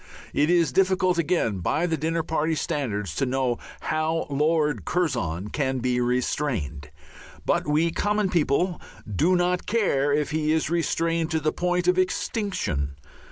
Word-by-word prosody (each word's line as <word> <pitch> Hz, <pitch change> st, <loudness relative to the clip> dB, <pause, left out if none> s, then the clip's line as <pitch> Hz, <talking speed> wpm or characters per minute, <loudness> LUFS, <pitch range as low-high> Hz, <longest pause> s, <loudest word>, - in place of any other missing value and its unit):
It 150 Hz, +2 st, +2 dB
is 170 Hz, -5 st, +3 dB
difficult 185 Hz, +1 st, +2 dB
again 155 Hz, -, +1 dB
by 155 Hz, -, 0 dB
the 165 Hz, -2 st, 0 dB
dinner 160 Hz, +2 st, -1 dB
party 160 Hz, 0 st, 0 dB
standards 120 Hz, -, -2 dB
to 135 Hz, -, +1 dB
know 125 Hz, -2 st, 0 dB, 0.2 s
how 155 Hz, +1 st, 0 dB
Lord 150 Hz, +1 st, +1 dB
Curzon 115 Hz, -, -1 dB
can 135 Hz, -1 st, -1 dB
be 125 Hz, 0 st, 0 dB
restrained. 120 Hz, -, -1 dB, 0.6 s
But -, -, +1 dB
we 155 Hz, +3 st, +2 dB
common 205 Hz, +3 st, 0 dB
people 170 Hz, +2 st, +1 dB, 0.2 s
do 155 Hz, -, +2 dB
not 180 Hz, 0 st, 0 dB
care 185 Hz, -11 st, +2 dB
if 150 Hz, +2 st, 0 dB
he 155 Hz, 0 st, 0 dB
is 160 Hz, 0 st, 0 dB
restrained 165 Hz, -1 st, 0 dB
to 160 Hz, -1 st, 0 dB
the 155 Hz, 0 st, 0 dB
point 180 Hz, 0 st, 0 dB
of 180 Hz, 0 st, +4 dB
extinction. 180 Hz, -, -1 dB
155 Hz, 150 wpm, -25 LUFS, 130-175 Hz, 0.6 s, of